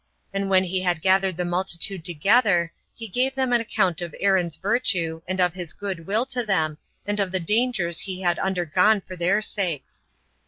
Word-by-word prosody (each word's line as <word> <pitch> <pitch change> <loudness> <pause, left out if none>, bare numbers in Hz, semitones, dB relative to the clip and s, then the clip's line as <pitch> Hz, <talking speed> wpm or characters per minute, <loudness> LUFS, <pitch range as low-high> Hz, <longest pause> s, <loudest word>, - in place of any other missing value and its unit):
And 195 0 -2
when 190 -1 +4
he 185 0 -2
had 175 -3 -1
gathered 190 -1 +2
the 180 - -1
multitude 175 0 -1
together, 175 0 +2 0.2
he 225 - -7
gave 255 +6 0
them 260 -2 0
an 240 - +4
account 185 -6 0
of 170 -3 -6
Aaron's 185 -5 +1
virtue, 185 -6 0
and 185 +1 -3
of 180 -2 +3
his 175 -3 -4
good 190 -5 -5
will 215 +5 +2
to 250 -2 -1
them, 160 -7 0 0.3
and 205 0 -1
of 195 -2 0
the 185 - 0
dangers 210 -3 +1
he 190 -1 -4
had 175 -2 +1
undergone 190 +3 +2
for 185 - -10
their 185 +5 +1
sakes. 180 -9 -3
190 Hz, 190 wpm, -24 LUFS, 175-205 Hz, 0.3 s, when